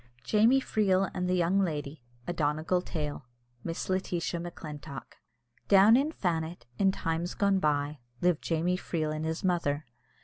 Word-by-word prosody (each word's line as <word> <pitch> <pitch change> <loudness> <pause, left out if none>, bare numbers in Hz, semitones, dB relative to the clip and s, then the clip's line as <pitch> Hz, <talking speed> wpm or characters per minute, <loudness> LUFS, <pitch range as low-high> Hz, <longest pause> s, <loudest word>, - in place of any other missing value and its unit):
] - - -30
JAMIE 225 +5 +5
FREEL 195 -5 +2
AND 180 -1 -2
THE 180 - +2
YOUNG 180 +2 +2
LADY. 150 -4 -4 0.2
A 175 - -2
Donegal 155 +3 0
Tale. 150 -6 -5 0.4
MISS 165 +1 -4
LETITIA 180 -2 -1
MACLINTOCK. 150 -5 -8 0.5
Down 200 +3 +7
in 280 +5 +2
Fannet, 165 - -2
in 195 -1 +4
times 165 -1 -2
gone 200 -1 +2
by, 145 -2 0 0.2
lived 175 -3 +2
Jamie 170 +2 0
Freel 155 -4 -2
and 155 +1 -3
his 160 +1 -3
mother. 165 -5 0
170 Hz, 150 wpm, -29 LUFS, 155-185 Hz, 0.5 s, Down